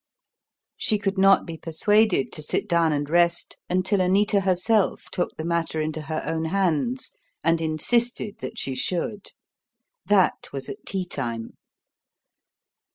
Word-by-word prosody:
She 215 - +1
could 195 -1 -2
not 195 0 +5
be 165 -2 -7
persuaded 190 +1 +2
to 155 - -3
sit 150 +7 -2
down 170 -3 +3
and 145 -1 -1
rest 170 +2 +1
until 185 +2 +1
Anita 200 +3 +3
herself 195 +2 +1
took 175 - -2
the 160 - -4
matter 170 -1 -1
into 155 0 -2
her 155 +1 -4
own 160 0 -2
hands 195 - 0 0.3
and 165 0 +2
insisted 210 +7 0
that 130 - -7
she 135 - -2
should. 185 +9 -2 0.8
That 200 -2 +2
was 135 -1 -4
at - - -9
tea 190 -2 -2
time. 120 -9 -4
175 Hz, 140 wpm, -24 LUFS, 155-200 Hz, 0.8 s, not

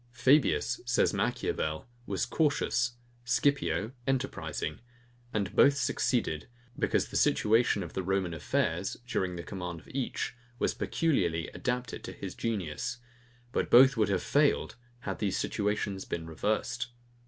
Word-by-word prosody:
Fabius, 130 +5 +3
says - - +2
Machiavel, 80 +4 -1 0.2
was - - 0
cautious; 135 -5 +1 0.3
Scipio 125 -3 +1 0.2
enterprising: 135 - -2 0.5
And 100 -3 -2
both 140 0 +6
succeeded, 80 - 0 0.3
because - - +1
the - - -9
situation 110 -2 +3
of 85 - -8
the 95 - -1
Roman 95 -1 0
affairs, 80 - -1
during 95 -7 -1
the 85 - -5
command 90 -3 -5
of - - -19
each, 130 -1 -2 0.2
was - - +1
peculiarly 85 - 0
adapted 125 -1 -3
to - - -6
his - - -6
genius; 100 -1 -3 0.5
but - - 0
both 130 +3 +8
would 110 -3 +2
have 95 -2 +1
failed, 145 0 +2 0.3
had 140 - -4
these 100 -3 0
situations 105 -2 -1
been 80 -1 -4
reversed. 110 +8 -1
110 Hz, 130 wpm, -30 LUFS, 90-125 Hz, 0.5 s, both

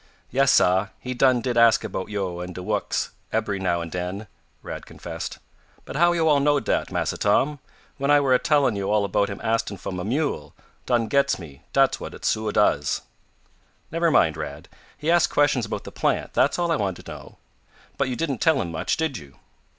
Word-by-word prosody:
"Yes, 135 +1 +4
sah, 95 +3 +4
he 125 - -5
done 125 -1 +3
did 120 0 0
ask 115 -1 +5
about 95 -2 -4
yo', 95 -4 -3
and 90 0 -6
de 90 - -6
wuks, - - -1 0.2
ebery 105 -3 -1
now 85 -2 0
and 85 -1 -6
den," 90 +4 -4 0.4
Rad - - -7
confessed. - - -7 0.5
"But - - -8
how 175 +3 +4
yo' 165 -2 +1
all 150 -2 +5
knowed 145 -3 +2
dat, - - 0
Massa - - -2
Tom, 140 +8 +2 0.4
when 140 0 -1
I 145 0 +6
were 135 -2 +2
a 125 - +5
tellin' 145 -7 +2
yo' 100 0 -2
all 105 -1 +2
about 100 0 +1
him 100 - -6
astin' 115 -2 -1
fo' - - -6
mah 90 -1 -4
mule, 130 - -2 0.3
done 120 -2 +2
gets 140 +5 +2
me 75 -6 -12
dat's - - +3
what - - -7
it - - -9
suah 110 0 0
does." 75 -9 +2 0.9
"Never 165 +1 +2
mind, 80 - +3
Rad. - - -7 0.3
He 155 +3 0
asked 175 -1 +4
questions 140 -6 +2
about 110 - -4
the - - -9
plant, - - -1
that's - - +2
all 175 -1 0
I 165 - +2
want 95 -6 -2
to - - -14
know. - - -11 0.6
But 140 -2 +1
you 125 - -2
didn't 140 -4 -2
tell - - +4
him 85 - -3
much, 80 - -1
did 160 - -1
you?" 70 -3 -15
115 Hz, 210 wpm, -24 LUFS, 95-140 Hz, 0.9 s, I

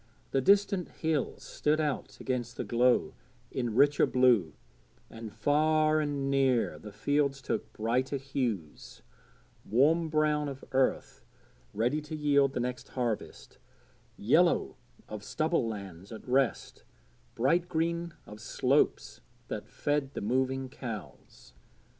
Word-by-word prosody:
The 135 - +2
distant 200 +2 +3
hills 160 -4 -2
stood 150 +1 0
out 150 -3 -2
against 125 -2 -3
the - - -2
glow 125 +1 +2 0.4
in 120 -4 -2
richer 145 +3 +4
blue, 120 - +3 0.6
and 115 -1 -8
far 155 +3 +2
and 140 -2 -1
near 135 -3 +2
the 105 - -10
fields 140 +6 0
took 130 - -3
brighter 125 +5 0
hues 125 - -4 0.6
warm 155 +9 +3
brown 150 -1 +1
of 135 -1 -9
earth 135 0 0 0.5
ready 120 +8 0
to 150 +1 -7
yield 140 -2 +3
the - - -2
next 125 +1 -3
harvest, 120 -4 -4 0.6
yellow - - +3 0.3
of 105 -1 -7
stubble 155 0 0
lands 100 -3 -7
at 110 - -9
rest, 130 -2 0 0.5
bright 170 +9 +2
green 170 0 -1
of 105 0 -11
slopes 110 - 0 0.3
that - - -5
fed 145 -2 -1
the - - -3
moving 130 +4 0
cows. 115 - -9
135 Hz, 125 wpm, -30 LUFS, 120-150 Hz, 0.6 s, richer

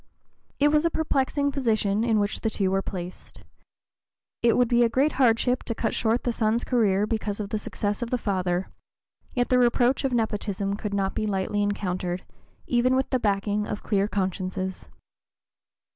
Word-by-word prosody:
It 290 +1 +4
was 300 +1 +3
a 335 - +3
perplexing 285 -2 0
position 220 -6 +1
in 225 -2 +2
which 205 0 -1
the 225 - 0
two 195 -3 0
were 195 0 +1
placed. 180 -2 -8 1.0
It 235 -1 +3
would 245 -1 +4
be 240 +1 +3
a 235 - +3
great 270 +6 +2
hardship 245 +1 +3
to 230 - -3
cut 225 - -1
short 230 +2 +1
the 240 - 0
son's 225 +1 +1
career 210 -5 +2
because 215 -2 -2
of 205 -2 -4
the 215 - -2
success 205 0 -3
of 240 - -3
the 250 - +1
father, 185 -4 -1 0.6
yet 245 -1 +1
the 250 - +4
reproach 245 +2 +3
of 270 - 0
nepotism 205 -4 -1
could 205 -1 -4
not 195 -1 0
be 215 - -2
lightly 200 +1 -1
encountered, 185 -3 -2 0.4
even 250 +1 +2
with 265 0 0
the 255 - +2
backing 205 0 0
of 205 - -5
clear 200 -1 +1
consciences. 190 -1 -3
215 Hz, 175 wpm, -26 LUFS, 200-245 Hz, 1.0 s, It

